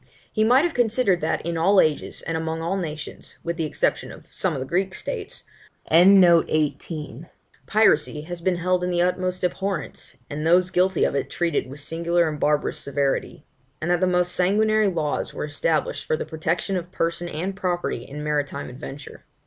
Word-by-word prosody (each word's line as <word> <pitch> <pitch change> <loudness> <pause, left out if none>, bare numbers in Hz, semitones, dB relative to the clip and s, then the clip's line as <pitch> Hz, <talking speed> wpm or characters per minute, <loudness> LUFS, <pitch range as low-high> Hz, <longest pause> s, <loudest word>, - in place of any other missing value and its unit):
He 215 - +2
might 250 +6 +5
have 345 - -1
considered 225 -6 +2
that, 160 +1 -1
in 170 -1 -2
all 195 +4 +5
ages 155 -4 +1
and 165 - -3
among 160 0 -2
all 170 +4 -1
nations, 155 -5 -6
with 170 0 -2
the 165 -1 -2
exception 150 - -1
of - - -13
some - - 0
of - - -3
the 130 - -3
Greek 185 +6 -1
states, - - -3 0.4
piracy 160 - +4 1.0
has 175 +2 -7
been 185 +1 +1
held 180 +1 0
in 180 - 0
the 175 -1 +2
utmost 185 0 -1
abhorrence, 190 +2 -3
and 150 +1 -5
those 180 +3 +4
guilty 185 0 +2
of - - +2
it 140 - -2
treated 170 -6 -1
with 140 +2 -7
singular 170 +2 +1
and 150 -1 -4
barbarous 150 0 +1
severity; 140 -1 -2 0.3
and 165 +3 -1
that 175 - +3
the 185 - +2
most 180 -1 +2
sanguinary 215 +3 +3
laws 160 -6 -2
were - - -3
established 150 +1 -1
for 155 - +1
the - - -4
protection 165 +4 -2
of 180 -1 -4
person 170 -1 -2
and 180 +5 -3
property 175 -9 -2
in 150 +3 -8
maritime 145 -2 -2
adventure. 135 +3 -9
170 Hz, 180 wpm, -24 LUFS, 155-185 Hz, 1.0 s, might